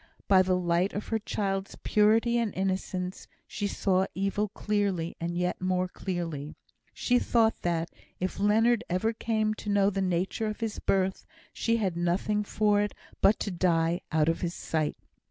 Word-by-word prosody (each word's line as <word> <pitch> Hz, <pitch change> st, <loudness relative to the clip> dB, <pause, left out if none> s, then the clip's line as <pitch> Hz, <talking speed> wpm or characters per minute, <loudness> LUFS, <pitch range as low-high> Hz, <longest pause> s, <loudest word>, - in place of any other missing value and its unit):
By 190 Hz, -2 st, +6 dB
the 185 Hz, 0 st, +2 dB
light 175 Hz, +2 st, +1 dB
of 205 Hz, -, -5 dB
her 225 Hz, -, +1 dB
child's 195 Hz, -2 st, -3 dB
purity 225 Hz, +3 st, +3 dB
and 230 Hz, -3 st, 0 dB
innocence, 185 Hz, -1 st, -2 dB, 0.2 s
she 205 Hz, -, -3 dB
saw 190 Hz, -1 st, +1 dB
evil 195 Hz, +2 st, 0 dB
clearly, 200 Hz, -5 st, -1 dB
and 170 Hz, +1 st, -2 dB
yet 180 Hz, +1 st, -1 dB
more 185 Hz, 0 st, +1 dB
clearly. 165 Hz, -6 st, -4 dB, 0.4 s
She 245 Hz, 0 st, +1 dB
thought 225 Hz, -2 st, +2 dB
that, 170 Hz, -1 st, -1 dB, 0.3 s
if 185 Hz, +1 st, -3 dB
Leonard 225 Hz, +3 st, +3 dB
ever 200 Hz, +6 st, +1 dB
came 220 Hz, -1 st, 0 dB
to 215 Hz, -, -7 dB
know 200 Hz, 0 st, +3 dB
the 195 Hz, 0 st, -1 dB
nature 185 Hz, +4 st, 0 dB
of 215 Hz, -, -4 dB
his 225 Hz, -2 st, -2 dB
birth, 190 Hz, 0 st, 0 dB, 0.3 s
she 230 Hz, 0 st, +1 dB
had 190 Hz, -6 st, -1 dB
nothing 180 Hz, +5 st, 0 dB
for 210 Hz, 0 st, +2 dB
it 205 Hz, -, -2 dB, 0.3 s
but 205 Hz, -, +5 dB
to 205 Hz, -, -2 dB
die 170 Hz, -1 st, +1 dB
out 155 Hz, -1 st, +2 dB
of 165 Hz, 0 st, 0 dB
his 175 Hz, 0 st, -2 dB
sight. 155 Hz, -2 st, -2 dB
195 Hz, 170 wpm, -28 LUFS, 180-210 Hz, 0.4 s, By